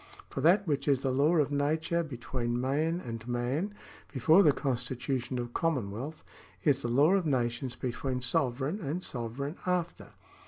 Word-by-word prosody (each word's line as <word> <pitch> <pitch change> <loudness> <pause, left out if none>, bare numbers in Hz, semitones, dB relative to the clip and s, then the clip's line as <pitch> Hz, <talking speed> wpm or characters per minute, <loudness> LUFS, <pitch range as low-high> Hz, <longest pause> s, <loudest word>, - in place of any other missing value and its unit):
For 135 - -3
that 185 +7 +5
which 145 -4 -1
is 140 -2 +2
the 135 - +1
law 145 +6 +3
of 145 -3 +2
nature 155 +4 +1
between 120 -4 -3
man 150 +7 0
and 115 -6 -7
man, 130 +12 -1 0.4
before 155 +8 +5
the 155 - +6
constitution 130 -1 -2
of 120 -1 -4
commonwealth, 140 -1 -2 0.4
is 140 -3 +3
the 120 - -1
law 140 +9 +4
of 190 -4 +2
nations 125 -2 -1
between 125 +1 -3
sovereign 130 - +1
and 165 +4 -3
sovereign 130 +6 -4
after." 180 -2 -2
135 Hz, 155 wpm, -30 LUFS, 125-160 Hz, 0.4 s, the